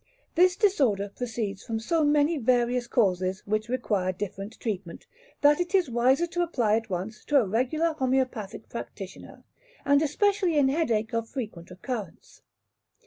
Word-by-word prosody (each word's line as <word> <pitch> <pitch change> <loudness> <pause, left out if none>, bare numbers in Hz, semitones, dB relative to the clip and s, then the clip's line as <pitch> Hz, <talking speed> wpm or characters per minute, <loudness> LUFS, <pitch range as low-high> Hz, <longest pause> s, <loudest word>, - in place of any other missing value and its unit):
This 360 +1 +4
disorder 265 - +2
proceeds 220 -5 -4
from 225 -2 -3
so 315 +8 +1
many 295 +2 +3
various 245 0 +1
causes, 190 -4 +1
which 215 +2 -1
require 210 -7 0
different 195 +3 -6
treatment, 190 -6 -5 0.4
that 295 +2 +5
it 355 +2 -1
is 360 -9 +2
wiser 255 +7 +3
to 350 +1 -2
apply 240 -11 +1
at 225 -1 -5
once 195 +4 -4
to 295 - +3
a 240 - +1
regular 265 - 0
homoeopathic 255 -6 -1
practitioner, 195 -4 -9 0.4
and 285 +1 +4
especially 370 +2 +1
in 275 -2 +4
headache 240 -7 0
of 230 0 -2
frequent 210 -10 -6
occurrence. 200 +1 -7
240 Hz, 145 wpm, -27 LUFS, 210-295 Hz, 0.4 s, that